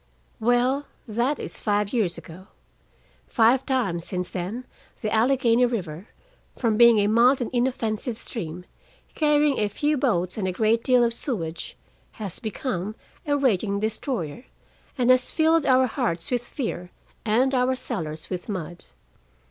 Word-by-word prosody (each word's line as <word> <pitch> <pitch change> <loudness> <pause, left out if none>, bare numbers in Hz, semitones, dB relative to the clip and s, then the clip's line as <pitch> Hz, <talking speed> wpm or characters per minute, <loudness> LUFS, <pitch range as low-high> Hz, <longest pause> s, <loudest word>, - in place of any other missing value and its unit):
Well, 245 +5 +2 0.2
that 235 +6 0
is - - -5
five 205 0 0
years 200 -8 0
ago. 185 +3 -12 0.8
Five 245 +3 +3
times 210 -11 0
since 180 0 -3
then 200 +8 -4 0.4
the 215 - -2
Allegheny 245 +1 +3
River, 185 -5 -4 0.5
from 230 -3 +1
being 235 0 +7
a 205 - +3
mild 235 +5 +4
and 240 - -3
inoffensive 240 -2 -1
stream, 180 -8 -6 0.5
carrying 295 -2 +2
a 210 -1 +1
few 295 +8 0
boats 185 -8 0
and 190 - -1
a - - 0
great 220 +4 +1
deal 250 -2 +4
of 235 -1 +1
sewage, 170 - -4 0.4
has 200 -5 -6
become, 215 -3 -4 0.3
a 285 0 +2
raging 210 -7 +1
destroyer, 220 - -3 0.5
and 250 -1 +4
has 255 0 +3
filled 320 -1 +2
our 260 0 +5
hearts 225 - -2
with 245 -2 +1
fear 225 - -5 0.3
and 245 +5 +2
our 255 0 +2
cellars 160 -12 -5
with 180 +3 -5
mud. 175 -3 -5
230 Hz, 145 wpm, -25 LUFS, 190-255 Hz, 0.8 s, being